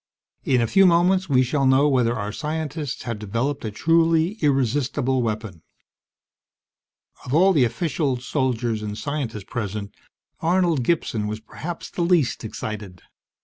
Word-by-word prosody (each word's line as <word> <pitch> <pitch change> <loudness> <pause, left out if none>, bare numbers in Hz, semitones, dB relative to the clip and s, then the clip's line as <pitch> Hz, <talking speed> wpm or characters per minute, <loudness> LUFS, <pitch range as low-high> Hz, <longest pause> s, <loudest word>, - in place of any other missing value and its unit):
In 125 -2 +2
a - - +2
few 195 - +5
moments 180 +1 +3
we 130 -2 +4
shall 135 +2 +1
know 135 +2 +5
whether 125 -4 +2
our 105 -2 -3
scientists 150 +1 -4
have 115 -3 -4
developed 115 +7 -2
a 110 - -2
truly 165 - +2
irresistible 135 -1 +1
weapon." 110 -6 -4 1.6
Of 125 - -2
all 190 +4 +5
the 140 -7 +4
officials, 130 0 -2
soldiers, 120 -6 -1
and 105 0 -5
scientists 135 -8 -4
present, 105 -3 -4 0.5
Arnold 170 -4 +2
Gibson 115 -7 0
was 110 +1 -4
perhaps 160 +10 -7
the - - -3
least 170 -9 +2
excited. 105 -4 -6
130 Hz, 140 wpm, -23 LUFS, 110-160 Hz, 1.6 s, few